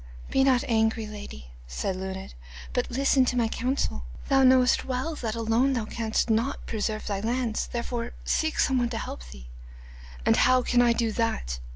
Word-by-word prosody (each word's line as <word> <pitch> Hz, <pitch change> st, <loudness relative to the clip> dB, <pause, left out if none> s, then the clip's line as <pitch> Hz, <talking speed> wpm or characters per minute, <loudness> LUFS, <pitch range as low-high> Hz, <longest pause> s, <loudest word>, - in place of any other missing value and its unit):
'Be 270 Hz, -, +3 dB
not 260 Hz, -2 st, +3 dB
angry, 225 Hz, -1 st, +1 dB
lady,' 205 Hz, -, -9 dB, 0.2 s
said -, -, -3 dB
Luned, 190 Hz, 0 st, -6 dB, 0.4 s
'but -, -, -1 dB
listen 270 Hz, +1 st, +3 dB
to 250 Hz, -, -1 dB
my 235 Hz, -2 st, +2 dB
counsel. 250 Hz, -, -2 dB, 0.3 s
Thou 270 Hz, -1 st, +4 dB
knowest 255 Hz, -1 st, +5 dB
well 260 Hz, +5 st, -2 dB
that 225 Hz, -4 st, -3 dB
alone 230 Hz, +4 st, +2 dB
thou 230 Hz, -4 st, -1 dB
canst 220 Hz, +1 st, -1 dB
not 230 Hz, +4 st, 0 dB
preserve 215 Hz, -1 st, -2 dB
thy 200 Hz, -2 st, -2 dB
lands, 230 Hz, +1 st, -1 dB
therefore 235 Hz, 0 st, -4 dB
seek 315 Hz, 0 st, 0 dB
some 265 Hz, -2 st, +3 dB
one 240 Hz, -1 st, 0 dB
to 235 Hz, -, -4 dB
help 60 Hz, -, -6 dB
thee.' 65 Hz, -1 st, -11 dB, 0.8 s
'And -, -, +4 dB
how 255 Hz, 0 st, +4 dB
can 245 Hz, 0 st, +3 dB
I 240 Hz, -1 st, +4 dB
do 230 Hz, -1 st, 0 dB
that? 135 Hz, -, -2 dB
230 Hz, 180 wpm, -26 LUFS, 215-255 Hz, 0.8 s, knowest